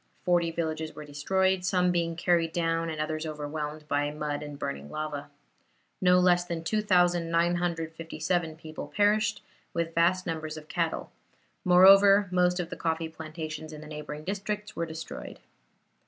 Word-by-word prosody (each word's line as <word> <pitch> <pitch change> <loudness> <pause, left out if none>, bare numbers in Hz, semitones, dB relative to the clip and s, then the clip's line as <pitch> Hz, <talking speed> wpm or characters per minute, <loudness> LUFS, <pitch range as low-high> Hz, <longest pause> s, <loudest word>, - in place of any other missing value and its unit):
Forty 175 -1 +2
villages 160 -1 -3
were 150 - -8
destroyed, 190 +6 +1
some 180 -1 +2
being 170 -1 0
carried 170 -1 +1
down 165 -1 0
and 155 -1 -5
others 155 0 -2
overwhelmed 150 0 -5
by 145 0 +1
mud 150 -1 -3
and 145 -1 -7
burning 70 - -5
lava. 155 -2 -4 0.7
No 180 -1 +5
less 175 -1 +4
than 170 -2 -4
2,957 170 -3 +1
people 155 0 -8
perished, 210 +1 +2 0.3
with 165 -1 -1
vast 175 +2 +2
numbers 155 -2 -4
of 155 -1 -10
cattle; - - -2 0.5
moreover, 195 +2 +7
most 180 0 +2
of 175 0 -3
the - - -3
coffee 165 -1 -2
plantations 155 -1 -7
in 155 -1 -9
the - - -10
neighboring 150 0 -7
districts 205 +3 -4
were 170 0 -2
destroyed. 160 0 -7
165 Hz, 145 wpm, -28 LUFS, 155-180 Hz, 0.7 s, moreover